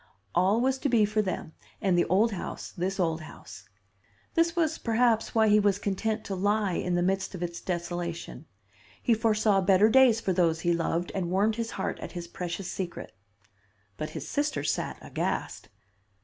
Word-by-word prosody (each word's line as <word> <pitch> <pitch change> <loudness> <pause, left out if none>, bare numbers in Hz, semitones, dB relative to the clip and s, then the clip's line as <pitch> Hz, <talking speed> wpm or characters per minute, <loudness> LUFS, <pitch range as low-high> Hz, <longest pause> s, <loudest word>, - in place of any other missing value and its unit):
All 190 +5 +3
was 265 +2 +1
to 280 - 0
be 225 -4 +4
for 215 +1 +1
them 185 -5 -4 0.3
and 190 -2 +2
the 175 - +3
old 205 +6 +3
house, 195 - -6
this 190 +3 -3
old 165 -2 0
house. 105 -9 -12 0.6
This 330 +1 +2
was 325 -2 +1
perhaps 230 -1 +1
why 220 -1 +5
he 210 0 +5
was 200 -2 +2
content 215 +2 -2
to 195 - -4
lie 205 +1 +1
in 180 +1 -1
the 175 - +1
midst 195 +1 -1
of 180 - -5
its 170 0 -5
desolation. 175 -2 -4 0.5
He 240 - +2
foresaw 215 -3 +2
better 195 +3 +5
days 255 -2 +6
for 195 -4 -1
those 165 -3 +2
he 175 -1 +2
loved, 170 +1 -1
and 180 -3 -2
warmed 205 +4 +1
his 230 -1 -2
heart 190 - -2
at - - -7
his 175 -2 -6
precious 180 +2 -5
secret. 180 -3 -5 0.8
"But 155 - -4
his - - -7
sister 290 - -1
sat - - -2
aghast. - - -3
195 Hz, 180 wpm, -28 LUFS, 175-220 Hz, 0.8 s, days